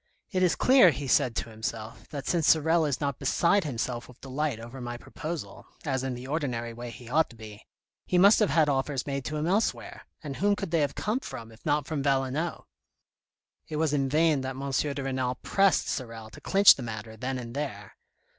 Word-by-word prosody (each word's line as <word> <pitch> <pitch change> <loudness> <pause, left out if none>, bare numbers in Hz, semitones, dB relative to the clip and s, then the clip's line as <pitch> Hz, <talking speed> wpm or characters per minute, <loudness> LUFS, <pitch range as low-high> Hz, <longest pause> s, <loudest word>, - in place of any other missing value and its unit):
It 185 - 0
is 180 -2 +3
clear, 255 -7 +6
he 145 -2 -3
said 125 -2 +2
to 115 - -3
himself, 110 0 -6
that 140 -2 -6
since 165 -3 +1
Sorel 160 +1 +4
is 140 - -1
not 140 -3 -2
beside 195 +2 +2
himself 120 -3 -3
with 125 - -16
delight 135 -2 -2
over 120 +3 -9
my 120 0 -5
proposal, 160 +6 -7 0.2
as 130 -3 -1
in 130 -2 -2
the 125 +1 -8
ordinary 125 -6 -2
way 120 +1 -7
he 120 +1 -11
ought 155 +6 +2
to - - -14
be, 110 -2 -12 0.4
he 180 - +2
must 200 +4 +7
have 210 - +3
had 160 -2 +3
offers 135 -1 -1
made 140 -1 -3
to 155 - -3
him 150 - -1
elsewhere, 200 +6 -1 0.2
and 140 -3 -5
whom 205 +1 +2
could 195 -4 -5
they 165 - +2
have 145 -2 -1
come 215 +5 -1
from, 120 - -8
if 110 - -18
not 145 -1 +2
from 145 0 -3
Valenod. 135 +4 0 1.0
It 155 - -5
was 155 -1 +1
in 135 -2 +1
vain 155 -1 +3
that 130 0 -4
M. 140 +1 -4
de 140 0 -1
Renal 130 -1 -1
pressed 195 -1 +3
Sorel 115 -4 -5
to - - -13
clinch 195 +1 +7
the - - -9
matter 110 -1 -6
then 130 +4 -3
and 120 -2 -7
there. 125 -9 -5
135 Hz, 210 wpm, -28 LUFS, 120-160 Hz, 1.0 s, must